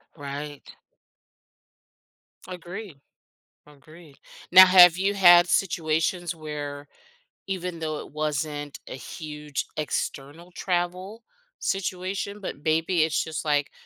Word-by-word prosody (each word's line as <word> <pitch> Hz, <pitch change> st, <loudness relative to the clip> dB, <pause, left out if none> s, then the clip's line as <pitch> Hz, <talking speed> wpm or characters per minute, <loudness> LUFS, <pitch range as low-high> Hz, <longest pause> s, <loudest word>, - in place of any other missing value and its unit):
Right. 145 Hz, 0 st, -8 dB, 1.7 s
Agree, 180 Hz, 0 st, -8 dB, 0.7 s
agree. 150 Hz, +1 st, -17 dB, 0.4 s
Now, 185 Hz, 0 st, +11 dB
have 180 Hz, -2 st, +8 dB
you 195 Hz, +2 st, 0 dB
had 175 Hz, -2 st, +7 dB
situations 170 Hz, -1 st, 0 dB
where 145 Hz, -2 st, -7 dB, 0.6 s
even 180 Hz, -3 st, -4 dB
though 155 Hz, -1 st, -3 dB
it -, -, -10 dB
wasn't 150 Hz, -1 st, -4 dB
a -, -, -7 dB
huge 150 Hz, 0 st, -6 dB
external 155 Hz, +3 st, -4 dB
travel 180 Hz, +5 st, -3 dB, 0.4 s
situation, 195 Hz, +1 st, -3 dB
but 190 Hz, -, -6 dB
maybe 160 Hz, +2 st, +1 dB
it's 160 Hz, 0 st, 0 dB
just 160 Hz, -1 st, -5 dB
like 145 Hz, -2 st, 0 dB
165 Hz, 100 wpm, -25 LUFS, 150-180 Hz, 1.7 s, Now